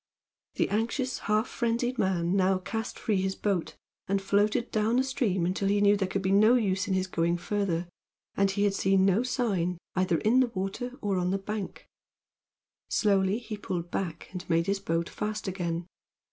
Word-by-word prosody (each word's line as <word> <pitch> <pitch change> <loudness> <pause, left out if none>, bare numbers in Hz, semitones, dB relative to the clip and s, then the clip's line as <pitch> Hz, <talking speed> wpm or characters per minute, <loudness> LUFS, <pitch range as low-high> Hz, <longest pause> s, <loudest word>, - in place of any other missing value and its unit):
The - - +1
anxious, 235 +5 -1
half 215 +2 +2
frenzied 240 +1 -1
man 180 -1 +1
now 190 0 +3
cast 220 +4 -4
free 205 -4 0
his 190 0 -1
boat, 195 -5 -1 0.3
and 195 +1 +1
floated 205 +4 +1
down 220 +2 +1
the 255 - +3
stream 220 -9 0
until 190 +2 0
he 205 +1 +2
knew 205 0 +5
there 195 -2 0
could 195 +1 -2
be 190 - +1
no 215 +5 +6
use 195 -4 +1
in 190 - +1
his 185 0 +1
going 170 -1 0
further, 175 -2 -1 0.5
and 195 0 +3
he 200 +1 0
had 205 -1 +2
seen 195 -1 +3
no 195 +3 +3
sign 200 -9 0 0.2
either 185 -2 +2
in 230 +8 +3
the 255 - +4
water 195 +7 -3
or 195 -3 0
on 180 0 0
the 195 - +1
bank. 205 0 -5 1.0
Slowly 195 -1 +2
he 225 -3 -6
pulled 175 -4 -4
back 170 -4 -3
and 180 -1 -7
made 165 0 +2
his 200 +1 0
boat 170 -3 -1
fast 210 0 -4
again. 175 -2 -2
195 Hz, 190 wpm, -28 LUFS, 185-215 Hz, 1.0 s, no